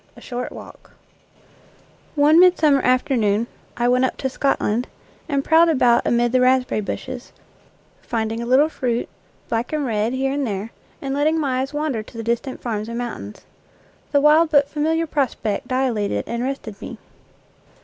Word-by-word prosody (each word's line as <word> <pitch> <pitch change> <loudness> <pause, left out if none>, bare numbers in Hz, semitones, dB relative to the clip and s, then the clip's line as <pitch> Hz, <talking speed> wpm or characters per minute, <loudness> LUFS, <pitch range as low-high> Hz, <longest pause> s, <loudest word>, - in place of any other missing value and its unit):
A - - -13
SHORT 250 0 -5
WALK - - -13 1.2
One 300 +2 +5
midsummer 320 -6 +5
afternoon 235 -4 +1 0.3
I 240 - +1
went 250 +1 +3
up 260 - 0
to 265 - -2
"Scot 275 +1 0
land 230 +4 -1 0.2
" - - -31
and 280 -2 0
prowled 330 +1 +5
about 250 -6 +3
amid 240 0 +2
the 255 0 +3
raspberry 255 -3 +2
bushes, 255 +4 -6 0.7
finding 225 0 -2
a 235 - -4
little 265 +5 +5
fruit, 245 -6 -2 0.4
black 230 +1 -2
and 305 -2 -1
red, 220 0 0
here 270 +1 0
and 280 -2 -1
there, 205 +2 -4 0.3
and 270 0 -2
letting 305 +3 +1
my 265 -4 0
eyes 270 - -4
wander 295 -6 -2
to 220 - -13
the 225 - -4
distant 235 +3 -3
farms 215 -2 -3
and 235 - -4
mountains. 230 - -6 0.7
The 285 - +3
wild 305 +2 +5
but 285 -2 +4
familiar 320 +3 0
prospect 255 -7 -2
dilated 250 -6 0
and 235 0 -3
rested 245 -6 -5
me. - - -7
255 Hz, 170 wpm, -21 LUFS, 235-285 Hz, 1.2 s, One